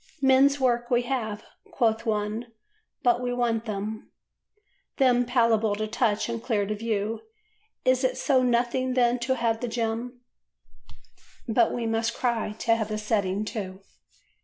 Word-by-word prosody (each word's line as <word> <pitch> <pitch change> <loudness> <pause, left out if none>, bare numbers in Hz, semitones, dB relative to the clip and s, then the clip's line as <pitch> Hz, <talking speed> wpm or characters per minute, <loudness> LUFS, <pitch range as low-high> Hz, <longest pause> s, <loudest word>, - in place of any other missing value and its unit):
"Men's 275 +1 +4
work 240 -2 +1
we 245 0 +2
have," 225 -5 -3 0.3
quoth 225 -2 +1
one, 215 +2 -1 0.6
"but 245 0 +3
we 250 0 -2
want 235 -2 0
them— 215 0 -5 0.9
Them 245 -2 +4
palpable 230 -4 +2
to 215 +1 -2
touch 215 -1 0
and 230 -1 -4
clear 225 -4 0
to 210 - -2
view." 215 0 -2 0.6
Is 255 +1 +3
it 260 - +1
so 265 -3 +2
nothing, 250 +1 +1
then, 245 -1 +3
to 260 +2 0
have 230 -2 0
the 245 - -3
gem 230 +1 -3 1.3
But 230 0 +3
we 235 - -3
must 225 +1 0
cry 235 -4 -1
to 230 -1 +3
have 220 -2 -2
the 215 0 -3
setting 210 -2 -1
too? 195 -3 -6
230 Hz, 150 wpm, -26 LUFS, 215-245 Hz, 1.3 s, Men's